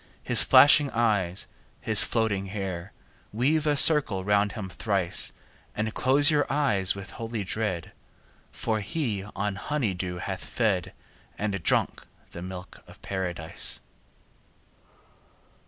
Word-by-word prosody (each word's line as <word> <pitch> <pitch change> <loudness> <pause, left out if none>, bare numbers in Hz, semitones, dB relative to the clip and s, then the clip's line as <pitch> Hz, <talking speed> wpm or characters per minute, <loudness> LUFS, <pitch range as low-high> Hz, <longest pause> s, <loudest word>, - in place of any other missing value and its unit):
His - - +5
flashing 145 0 +6
eyes, 105 -7 0 0.3
his - - +4
floating 105 -4 0
hair! 95 -2 -5 0.4
50 - - -10
Weave 150 +5 +1
a 145 -1 +2
circle 135 -11 +4
round 100 0 +1
him 105 -4 -6
thrice, 95 -2 -1 0.4
And 110 +1 -2
close 140 +4 +4
your 145 -1 +1
eyes 105 -11 +1
with 100 0 -9
holy 115 -2 -5
dread, 95 -4 -3 0.6
For 110 -1 -2
he 110 - -3
on 100 0 -3
honey 125 -3 -2
dew 90 0 -5
hath 95 +1 -5
fed, 100 -7 -1 0.4
And 100 -3 -3
drunk - - 0 0.2
the 85 - -9
milk 90 0 -9
of - - -15
Paradise. 85 -9 0
105 Hz, 125 wpm, -26 LUFS, 95-120 Hz, 0.6 s, flashing